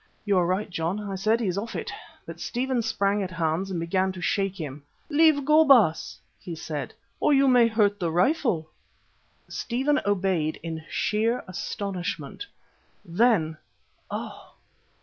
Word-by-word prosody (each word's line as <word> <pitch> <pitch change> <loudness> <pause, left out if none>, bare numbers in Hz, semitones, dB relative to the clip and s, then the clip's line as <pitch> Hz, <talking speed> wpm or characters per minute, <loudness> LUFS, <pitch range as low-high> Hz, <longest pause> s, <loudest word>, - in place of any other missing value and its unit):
"You 200 -3 +3
are 175 - +2
right, 185 +4 0
John," 175 +1 -2
I 205 -2 -5
said, 215 +4 +1
"he's 195 -4 -1
off 230 +3 -6
it"; - - -4 0.3
but - - -9
Stephen 250 0 -1
sprang 205 -3 0
at 190 - -3
Hans 170 +2 -1
and 180 -3 -2
began 185 +3 0
to 185 - -8
shake 195 +2 0
him. 145 -2 -6 0.3
"Leave 300 -2 +4
go, 305 +2 +6
Baas," 230 - +4 0.2
he 170 - -7
said, 155 -2 -5 0.2
"or 295 - +4
you 275 0 +4
may 245 -2 +6
hurt 210 -2 +2
the 175 -3 0
rifle." 180 - +1 0.8
Stephen 270 +5 0
obeyed 185 -6 0
in 160 -1 -5
sheer 225 +3 0
astonishment. 185 - -4 0.6
Then, 170 -4 +2 0.5
oh! - - -7
195 Hz, 150 wpm, -26 LUFS, 170-235 Hz, 0.8 s, go